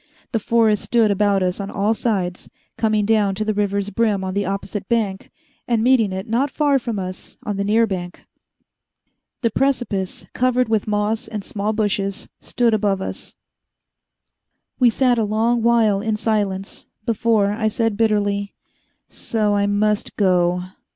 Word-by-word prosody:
The 225 Hz, -, 0 dB
forest 220 Hz, -1 st, +2 dB
stood 230 Hz, -3 st, +2 dB
about 200 Hz, -1 st, +2 dB
us 180 Hz, +1 st, -1 dB
on 200 Hz, 0 st, -4 dB
all 205 Hz, +2 st, +1 dB
sides, 190 Hz, -6 st, -2 dB, 0.3 s
coming 215 Hz, -2 st, +1 dB
down 205 Hz, -3 st, +2 dB
to 215 Hz, +2 st, -2 dB
the 215 Hz, -, 0 dB
river's 200 Hz, 0 st, -1 dB
brim 210 Hz, -2 st, +1 dB
on 185 Hz, 0 st, -3 dB
the 200 Hz, 0 st, -1 dB
opposite 195 Hz, 0 st, -4 dB
bank 210 Hz, -5 st, -1 dB, 0.4 s
and 230 Hz, -2 st, +1 dB
meeting 240 Hz, -5 st, +3 dB
it 190 Hz, +1 st, -5 dB
not 245 Hz, +6 st, +1 dB
far 285 Hz, 0 st, +2 dB
from 235 Hz, -3 st, -4 dB
us 185 Hz, -1 st, -6 dB
on 205 Hz, -2 st, -3 dB
the 200 Hz, -, 0 dB
near 220 Hz, +3 st, +3 dB
bank. 180 Hz, -4 st, -6 dB, 1.2 s
The 230 Hz, -, +2 dB
precipice, 240 Hz, -8 st, -1 dB
covered 250 Hz, -1 st, +1 dB
with 220 Hz, -2 st, 0 dB
moss 210 Hz, +1 st, -1 dB
and 210 Hz, -2 st, -5 dB
small 210 Hz, +2 st, -2 dB
bushes, 205 Hz, -2 st, -1 dB
stood 240 Hz, -2 st, 0 dB
above 200 Hz, -2 st, +1 dB
us. 190 Hz, -, -6 dB, 1.4 s
We 250 Hz, -2 st, +6 dB
sat 245 Hz, +1 st, +2 dB
a -, -, +2 dB
long 225 Hz, +3 st, +1 dB
while 225 Hz, -4 st, +3 dB
in 220 Hz, 0 st, -1 dB
silence, 205 Hz, -3 st, -2 dB, 0.2 s
before 220 Hz, -2 st, +2 dB
I 220 Hz, +1 st, -1 dB
said 225 Hz, 0 st, 0 dB
bitterly: 205 Hz, -2 st, 0 dB, 0.5 s
"So 215 Hz, -2 st, -1 dB
I 200 Hz, 0 st, +2 dB
must 210 Hz, +1 st, 0 dB
go." 180 Hz, -2 st, +2 dB
210 Hz, 160 wpm, -21 LUFS, 200-225 Hz, 1.4 s, We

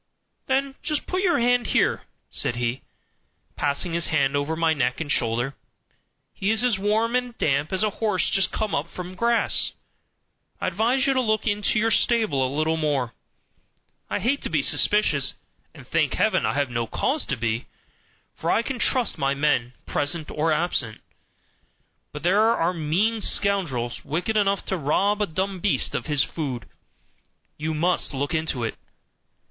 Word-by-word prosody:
"Then 270 Hz, +1 st, 0 dB
just 300 Hz, -2 st, -2 dB
put 370 Hz, 0 st, -1 dB
your 360 Hz, -3 st, +2 dB
hand 245 Hz, -1 st, +2 dB
here," -, -, +1 dB, 0.3 s
said 120 Hz, -, +1 dB
he, 120 Hz, +2 st, -2 dB, 0.7 s
passing 145 Hz, +4 st, -1 dB
his 170 Hz, 0 st, +2 dB
hand 140 Hz, -2 st, +1 dB
over 145 Hz, +3 st, -1 dB
my 165 Hz, 0 st, +2 dB
neck 125 Hz, -4 st, -1 dB
and 155 Hz, -3 st, -3 dB
shoulder; 120 Hz, +3 st, 0 dB, 0.8 s
"he 195 Hz, -, -2 dB
is 220 Hz, +2 st, +3 dB
as 235 Hz, -6 st, +2 dB
warm 220 Hz, +4 st, +1 dB
and 250 Hz, -1 st, -2 dB
damp 145 Hz, +1 st, 0 dB
as 190 Hz, +2 st, 0 dB
a 215 Hz, -, +1 dB
horse 210 Hz, -5 st, +1 dB
just 195 Hz, -3 st, +2 dB
come 215 Hz, -1 st, -2 dB
up 145 Hz, +4 st, -1 dB
from 180 Hz, 0 st, -7 dB
grass. 235 Hz, +4 st, +2 dB, 0.9 s
I -, -, -3 dB
advise 230 Hz, +8 st, +1 dB
you 275 Hz, -, +3 dB
to 260 Hz, -, +2 dB
look 215 Hz, -3 st, 0 dB
into 210 Hz, -1 st, +1 dB
your 225 Hz, +1 st, +2 dB
stable 220 Hz, -, +2 dB
a 130 Hz, -, 0 dB
little 155 Hz, +3 st, 0 dB
more. 145 Hz, -6 st, -1 dB, 1.0 s
I -, -, -1 dB
hate 275 Hz, +5 st, 0 dB
to -, -, -3 dB
be -, -, +1 dB
suspicious, 150 Hz, -11 st, +2 dB, 0.4 s
and, -, -, -14 dB
thank -, -, 0 dB
heaven, -, -, +2 dB
I -, -, 0 dB
have 140 Hz, -3 st, 0 dB
no 115 Hz, -1 st, -2 dB
cause 290 Hz, -, 0 dB
to 135 Hz, -, 0 dB
be, 115 Hz, +1 st, -2 dB, 0.7 s
for 165 Hz, -, -3 dB
I 230 Hz, -, +2 dB
can 260 Hz, 0 st, -4 dB
trust 245 Hz, -, +2 dB
my 135 Hz, 0 st, +1 dB
men, 140 Hz, -4 st, +1 dB
present 155 Hz, +2 st, -2 dB
or 160 Hz, +2 st, 0 dB
absent; 150 Hz, -9 st, -1 dB, 1.1 s
but 150 Hz, -, -8 dB
there 190 Hz, +5 st, +4 dB
are 200 Hz, -6 st, +2 dB
mean 185 Hz, +8 st, 0 dB
scoundrels, 160 Hz, -15 st, +1 dB
wicked 175 Hz, +9 st, -2 dB
enough 200 Hz, -2 st, +1 dB
to 190 Hz, -, -1 dB
rob 195 Hz, +8 st, +1 dB
a 205 Hz, -, +1 dB
dumb 190 Hz, +3 st, -2 dB
beast 200 Hz, +2 st, +1 dB
of -, -, -3 dB
his 145 Hz, -3 st, +2 dB
food. 130 Hz, -, -4 dB, 0.9 s
You 155 Hz, +1 st, -3 dB
must 170 Hz, -2 st, +2 dB
look 145 Hz, +5 st, -2 dB
into 155 Hz, -6 st, 0 dB
it." 115 Hz, -, -2 dB
170 Hz, 170 wpm, -24 LUFS, 145-215 Hz, 1.1 s, there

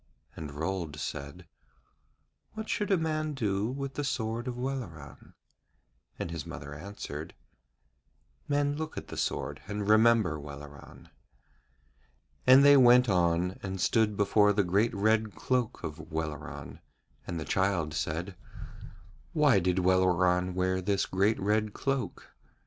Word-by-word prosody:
And 75 Hz, -3 st, -7 dB
Rold 80 Hz, -1 st, -3 dB
said: 70 Hz, +7 st, -6 dB, 1.1 s
'What 220 Hz, 0 st, -6 dB
should 210 Hz, -, -1 dB
a 195 Hz, -, +4 dB
man 155 Hz, -2 st, -2 dB
do 105 Hz, -4 st, 0 dB
with 135 Hz, +2 st, -4 dB
the 145 Hz, -, -3 dB
sword 115 Hz, -2 st, -2 dB
of 125 Hz, -1 st, -4 dB
Welleran?' 120 Hz, -, -6 dB, 0.8 s
And 85 Hz, -, -4 dB
his 85 Hz, -3 st, -4 dB
mother 70 Hz, +1 st, -8 dB
answered: 100 Hz, +8 st, -7 dB, 1.1 s
'Men 145 Hz, 0 st, +1 dB
look 155 Hz, 0 st, -5 dB
at -, -, -6 dB
the -, -, -7 dB
sword 70 Hz, +2 st, -3 dB
and 105 Hz, 0 st, -3 dB
remember 110 Hz, -7 st, +4 dB
Welleran.' 70 Hz, -1 st, -11 dB, 1.4 s
And 130 Hz, +2 st, +8 dB
they 145 Hz, 0 st, +8 dB
went 125 Hz, -1 st, +6 dB
on 90 Hz, 0 st, +1 dB
and 95 Hz, -1 st, -5 dB
stood 105 Hz, +1 st, +2 dB
before 105 Hz, 0 st, +4 dB
the 100 Hz, 0 st, +2 dB
great 100 Hz, +6 st, +1 dB
red 110 Hz, -1 st, +1 dB
cloak 125 Hz, +5 st, -1 dB
of 80 Hz, 0 st, -7 dB
Welleran, 80 Hz, -2 st, -5 dB, 0.5 s
and 85 Hz, -2 st, -3 dB
the 75 Hz, -, -5 dB
child 95 Hz, -5 st, 0 dB
said: 85 Hz, +6 st, -3 dB, 1.0 s
'Why 145 Hz, -9 st, +4 dB
did 90 Hz, 0 st, 0 dB
Welleran 90 Hz, 0 st, +3 dB
wear 95 Hz, 0 st, 0 dB
this 100 Hz, +1 st, 0 dB
great 100 Hz, +4 st, +1 dB
red 105 Hz, +1 st, 0 dB
cloak?' 135 Hz, -2 st, -3 dB
100 Hz, 130 wpm, -29 LUFS, 85-120 Hz, 1.4 s, And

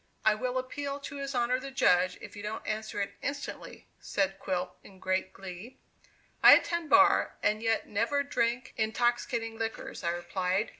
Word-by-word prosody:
"I 215 Hz, -, +6 dB
will 250 Hz, +4 st, -2 dB
appeal 280 Hz, +2 st, -4 dB
to 285 Hz, 0 st, -7 dB
his 275 Hz, -1 st, -4 dB
honor 245 Hz, +1 st, +2 dB
the 275 Hz, +1 st, -7 dB
judge, 185 Hz, -8 st, +3 dB
if -, -, -10 dB
you 205 Hz, -, -7 dB
don't 210 Hz, +1 st, -5 dB
answer 215 Hz, -1 st, -3 dB
it 200 Hz, 0 st, -3 dB
instantly," 285 Hz, 0 st, -6 dB
said 195 Hz, -1 st, -1 dB
Quilp 180 Hz, -1 st, -3 dB
in 190 Hz, -, -15 dB
great 185 Hz, 0 st, -1 dB
glee. 195 Hz, +7 st, -9 dB, 0.6 s
"I -, -, +11 dB
attend 340 Hz, -2 st, -1 dB
bar, -, -, +5 dB
and 210 Hz, +1 st, +2 dB
yet 225 Hz, -1 st, 0 dB
never 230 Hz, +7 st, 0 dB
drink 245 Hz, -2 st, -1 dB
intoxicating 225 Hz, 0 st, 0 dB
liquors," 225 Hz, 0 st, -4 dB
I 170 Hz, -, +1 dB
replied. 180 Hz, +4 st, -1 dB
225 Hz, 165 wpm, -30 LUFS, 195-255 Hz, 0.6 s, I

